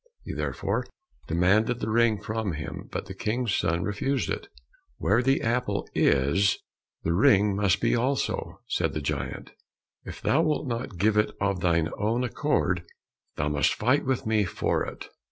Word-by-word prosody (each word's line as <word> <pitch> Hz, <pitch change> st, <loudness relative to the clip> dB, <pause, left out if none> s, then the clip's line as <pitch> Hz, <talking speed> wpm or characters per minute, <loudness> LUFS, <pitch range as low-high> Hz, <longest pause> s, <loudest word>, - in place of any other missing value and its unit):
He -, -, -5 dB
therefore -, -, -2 dB, 0.4 s
demanded 100 Hz, +8 st, +2 dB
the 110 Hz, -, -2 dB
ring 115 Hz, -2 st, +3 dB
from 110 Hz, -2 st, -3 dB
him, 75 Hz, -1 st, -6 dB
but -, -, -3 dB
the 95 Hz, -, -7 dB
King's 110 Hz, +3 st, -1 dB
son 85 Hz, +2 st, +1 dB
refused 115 Hz, +6 st, -1 dB
it. -, -, -4 dB, 0.5 s
"Where 110 Hz, +4 st, +2 dB
the 135 Hz, +2 st, +2 dB
apple 115 Hz, -3 st, 0 dB
is, 95 Hz, +10 st, +3 dB, 0.5 s
the 85 Hz, -, +1 dB
ring 100 Hz, +2 st, +4 dB
must 100 Hz, -2 st, +2 dB
be -, -, +2 dB
also," 130 Hz, +3 st, -1 dB
said -, -, 0 dB
the 75 Hz, -, -1 dB
giant; 70 Hz, -, -4 dB, 0.5 s
"if -, -, -8 dB
thou 155 Hz, -, +2 dB
wilt 155 Hz, -3 st, 0 dB
not 115 Hz, -6 st, -4 dB
give 105 Hz, +4 st, +2 dB
it 105 Hz, -, +3 dB
of 100 Hz, -2 st, 0 dB
thine 85 Hz, -2 st, +2 dB
own 115 Hz, +4 st, +1 dB
accord, 125 Hz, -, 0 dB, 0.5 s
thou 75 Hz, +1 st, -1 dB
must 75 Hz, 0 st, +2 dB
fight 125 Hz, +6 st, +2 dB
with 130 Hz, -1 st, -1 dB
me 110 Hz, -1 st, +2 dB
for 90 Hz, -, 0 dB
it." -, -, -7 dB
105 Hz, 165 wpm, -27 LUFS, 90-120 Hz, 0.5 s, ring